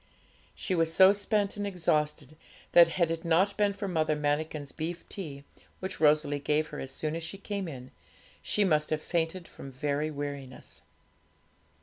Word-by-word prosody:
She 190 - -2
was 165 -2 +2
so 190 +3 +7
spent 205 0 0
and 205 0 -2
exhausted 155 -5 -1 0.4
that, 170 -1 +8
had 170 -3 +2
it 165 0 -3
not 180 +4 +3
been 205 -1 +2
for 200 0 -5
Mother 160 -4 +1
Manikin's 150 -1 -2
beef 165 +2 -5
tea, 145 -8 -7 0.4
which 185 0 -5
Rosalie 150 -1 +3
gave 150 +2 0
her 150 - -7
as 135 - -5
soon 155 +3 -3
as 165 - -4
she 165 +4 -6
came 200 -1 -4
in, 130 -4 -8 0.5
she 210 - +1
must 155 -5 +2
have 155 - 0
fainted 170 +1 -1
from 135 - -10
very 145 +3 -1
weariness. 140 -3 -7
160 Hz, 165 wpm, -29 LUFS, 150-185 Hz, 0.5 s, that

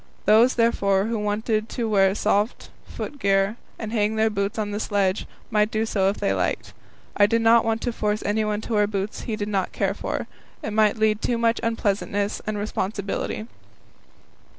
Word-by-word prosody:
Those, 225 +4 +5
therefore, 200 -4 +2
who 225 0 -1
wanted 215 +1 -1
to 235 -3 -2
wear 195 -2 +3
soft 210 +2 0 0.2
foot 290 - -7
gear, 195 +1 +2 0.2
and 220 -1 -5
hang 215 -1 +1
their 220 0 +2
boots 200 +2 -2
on 210 -1 -2
the 205 - -3
sledge, 200 -2 0 0.2
might 210 -1 +3
do 220 0 0
so 195 -3 +1
if 200 - -3
they 200 - 0
liked. - - -2 0.4
I 205 - +5
did 230 +2 +1
not 230 0 +6
want 225 0 0
to 240 - -2
force 210 -1 -1
anyone 210 0 0
to 230 - -5
wear 210 -1 +3
boots 200 0 -3
he 220 - 0
did 205 -1 -3
not 195 -3 -1
care 195 -1 0
for; - - -4 0.4
it 215 - -3
might 215 0 +3
lead 215 -1 +2
to - - -1
too 240 - +1
much 230 0 +2
unpleasantness 205 -2 -1
and 215 -1 -1
responsibility. 205 0 -3
210 Hz, 190 wpm, -24 LUFS, 205-220 Hz, 0.4 s, not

